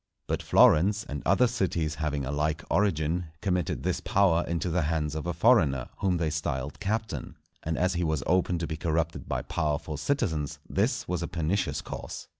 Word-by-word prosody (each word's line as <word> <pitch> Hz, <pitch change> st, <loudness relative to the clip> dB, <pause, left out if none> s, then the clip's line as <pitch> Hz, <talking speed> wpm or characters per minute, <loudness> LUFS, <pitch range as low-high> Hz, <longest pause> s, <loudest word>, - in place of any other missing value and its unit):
But -, -, -2 dB
Florence, 100 Hz, +7 st, +5 dB
and 75 Hz, 0 st, -4 dB
other 125 Hz, -, +5 dB
cities 90 Hz, -10 st, 0 dB
having 75 Hz, -3 st, -1 dB
a 70 Hz, -, -3 dB
like 75 Hz, +2 st, -1 dB
origin, 85 Hz, -3 st, +1 dB
committed 90 Hz, -4 st, -1 dB
this -, -, 0 dB
power 90 Hz, -4 st, +3 dB
into 85 Hz, +1 st, -1 dB
the 90 Hz, +2 st, +1 dB
hands 75 Hz, -1 st, -1 dB
of 80 Hz, +2 st, -4 dB
a -, -, +1 dB
foreigner, 80 Hz, -, +3 dB
whom 95 Hz, -2 st, +1 dB
they 80 Hz, -2 st, 0 dB
styled 70 Hz, -2 st, -3 dB
Captain, 105 Hz, -3 st, -3 dB, 0.3 s
and 80 Hz, 0 st, -2 dB
as 90 Hz, +1 st, +2 dB
he 90 Hz, 0 st, -1 dB
was 80 Hz, -3 st, 0 dB
open 90 Hz, 0 st, +2 dB
to 85 Hz, -, -2 dB
be 80 Hz, -1 st, -4 dB
corrupted 80 Hz, -1 st, -1 dB
by -, -, -1 dB
powerful 75 Hz, 0 st, -2 dB
citizens 80 Hz, -, -1 dB
this -, -, 0 dB
was 90 Hz, -1 st, -1 dB
a 85 Hz, -, -2 dB
pernicious 80 Hz, -3 st, -1 dB
course. -, -, -7 dB
80 Hz, 185 wpm, -28 LUFS, 75-90 Hz, 0.3 s, Florence